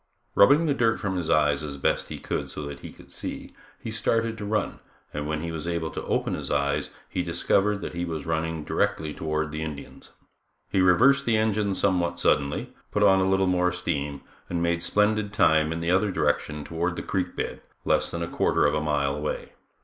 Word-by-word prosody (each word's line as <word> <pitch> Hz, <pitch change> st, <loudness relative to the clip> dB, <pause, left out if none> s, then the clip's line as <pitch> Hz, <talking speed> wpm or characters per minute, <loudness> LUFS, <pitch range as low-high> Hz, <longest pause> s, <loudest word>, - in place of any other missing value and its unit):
Rubbing 145 Hz, +11 st, +6 dB
the 150 Hz, -, +2 dB
dirt 115 Hz, -4 st, +2 dB
from 95 Hz, -3 st, -2 dB
his 90 Hz, -3 st, -2 dB
eyes 75 Hz, -2 st, +3 dB
as 70 Hz, -2 st, -5 dB
best -, -, 0 dB
he -, -, -5 dB
could -, -, -3 dB
so 75 Hz, -, -6 dB
that 70 Hz, 0 st, -6 dB
he -, -, -9 dB
could -, -, -17 dB
see, -, -, -6 dB, 0.3 s
he 115 Hz, -, -4 dB
started 115 Hz, +1 st, 0 dB
to 105 Hz, -, -4 dB
run 105 Hz, +1 st, -1 dB, 0.3 s
and 75 Hz, 0 st, -3 dB
when 80 Hz, 0 st, -2 dB
he 85 Hz, -, -3 dB
was 80 Hz, 0 st, -5 dB
able 85 Hz, -2 st, -2 dB
to -, -, -5 dB
open -, -, 0 dB
his -, -, -4 dB
eyes 70 Hz, +2 st, 0 dB, 0.2 s
he 90 Hz, -, -2 dB
discovered 95 Hz, +4 st, +1 dB
that -, -, -5 dB
he 85 Hz, 0 st, -3 dB
was 80 Hz, -4 st, -4 dB
running 80 Hz, -1 st, -2 dB
directly 75 Hz, 0 st, -1 dB
toward 75 Hz, -1 st, -2 dB
the 75 Hz, +1 st, -4 dB
Indians. 75 Hz, -3 st, -7 dB, 0.6 s
He 95 Hz, -, +3 dB
reversed 135 Hz, +10 st, +5 dB
the 115 Hz, -2 st, +3 dB
engines 105 Hz, -2 st, +1 dB
somewhat 85 Hz, -3 st, +1 dB
suddenly, 70 Hz, -4 st, +1 dB, 0.2 s
put -, -, +1 dB
on 95 Hz, 0 st, +6 dB
a 95 Hz, 0 st, +2 dB
little 95 Hz, 0 st, +3 dB
more 90 Hz, -1 st, +2 dB
steam, 75 Hz, -6 st, -3 dB, 0.3 s
and 85 Hz, -1 st, -1 dB
made 85 Hz, 0 st, +1 dB
splendid 105 Hz, +3 st, +1 dB
time 80 Hz, -6 st, +3 dB
in 80 Hz, 0 st, -3 dB
the 85 Hz, +1 st, 0 dB
other 95 Hz, +3 st, +3 dB
direction 75 Hz, -5 st, 0 dB
toward 85 Hz, +3 st, -2 dB
the -, -, -5 dB
creek 90 Hz, -2 st, -2 dB
bed, -, -, -4 dB, 0.2 s
less -, -, +2 dB
than 85 Hz, 0 st, -3 dB
a -, -, -3 dB
quarter -, -, +2 dB
of 75 Hz, -, +3 dB
a 75 Hz, -, 0 dB
mile 70 Hz, -2 st, 0 dB
away. 75 Hz, +1 st, -4 dB
85 Hz, 210 wpm, -26 LUFS, 75-100 Hz, 0.6 s, Rubbing